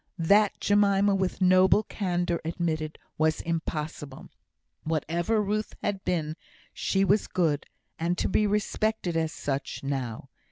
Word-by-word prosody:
that 200 +5 +3
Jemima, 200 -1 +3
with 190 -1 -1
noble 185 +3 +5
candour, 175 -5 -1
admitted 160 -2 -2 0.2
was 155 0 +2
impossible. 155 -4 -4 0.5
Whatever 170 +7 0
Ruth 210 +1 -2
had 195 -2 -2
been, 160 -3 -1 0.4
she 195 0 +1
was 205 +2 +2
good, 155 -5 0 0.3
and 170 +2 0
to - - 0
be 210 +2 +2
respected 210 -2 -1
as 160 -1 0
such, 140 0 -4
now. 130 -5 -3
175 Hz, 125 wpm, -27 LUFS, 155-200 Hz, 0.5 s, noble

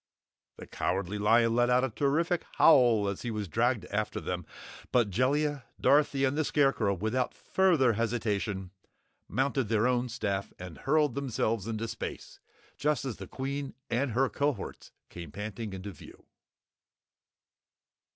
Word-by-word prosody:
The - - -9
Cowardly 95 +2 -2
Lion 115 +2 +4
let 120 0 +3
out 125 +1 +4
a 130 - +1
terrified 160 +8 +1
howl 120 -9 +6
as 100 -1 -3
he 120 - -3
was 105 -3 -3
dragged 115 +2 +1
after 105 +1 -1
them, 90 -2 -4 0.4
but 120 -5 +2
Jellia, 140 +5 +1
Dorothy 140 -1 +3
and 135 +1 0
the 155 - +1
Scarecrow, 135 -9 +2
without 110 +7 -1
further 165 -11 +3
hesitation, 105 -4 -2 0.6
mounted 135 -1 0
their 110 +1 +2
own 125 0 +1
staff 100 -4 -3
and 90 -2 -9
hurled 150 -1 +2
themselves 115 -6 -1
into 115 0 -3
space, - - -7 0.4
just 150 -1 0
as 125 -5 -4
the 95 - -8
Queen 135 +3 -4 0.2
and 120 +1 0
her 130 +3 +3
cohorts 140 -5 -3 0.2
came 85 -4 -8
panting 105 +2 -5
into 95 +1 -6
view. 80 - -15
120 Hz, 140 wpm, -29 LUFS, 105-135 Hz, 0.6 s, howl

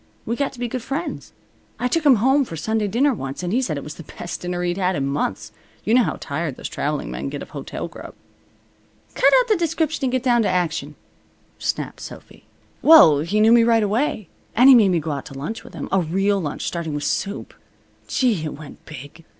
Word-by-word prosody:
We 235 - -1
got 280 +2 -1
to 250 - -13
be 245 - -1
good 250 +2 -4
friends. 280 +8 -5 0.5
I 250 - 0
took 310 +4 +1
him 270 - +7
home 265 +6 +3
for 165 - -7
Sunday 215 +6 -1
dinner 260 +8 +2
once, 135 - -6
and 180 +2 -2
he 255 - +2
said 165 - -2
it 140 - -6
was 150 - -7
the 155 - -14
best 175 - -6
dinner 180 0 -3
he'd 175 +1 -1
had 185 0 +1
in 135 - -1
months. 135 -7 -2 0.3
You 220 - 0
know 250 - +6
how - - -1
tired 145 -1 -3
those - - -6
traveling 145 0 -3
men - - -4
get 145 0 -6
of - - -14
hotel - - -6
grub." - - -11 1.0
"Cut - - +4
out - - +1
the 435 - +3
description 320 -4 -1
and 255 - 0
get 255 -1 -1
down 240 -2 +3
to 215 - +1
action," 165 -5 -1 0.6
snapped - - -3
Sophy. - - -11 0.4
"Well, 290 - +8
he 175 +8 0
knew 220 +1 +5
me 235 0 +6
right 230 -1 +3
away. 215 - -1 0.3
And 250 +4 +7
he - - +10
made 215 -5 +5
me 175 -2 +2
go 155 0 -4
out 140 -2 -5
to 135 - -11
lunch 160 +12 -5
with - - -13
him. - - -5
A 195 - +3
real 195 +4 0
lunch, 145 -3 -4
starting 165 -3 -3
with 145 - -3
soup. 200 +1 -3 0.5
Gee! 225 - +1
It 150 - -5
went 150 -1 -12
big. 145 +2 -11
195 Hz, 230 wpm, -22 LUFS, 155-245 Hz, 1.0 s, he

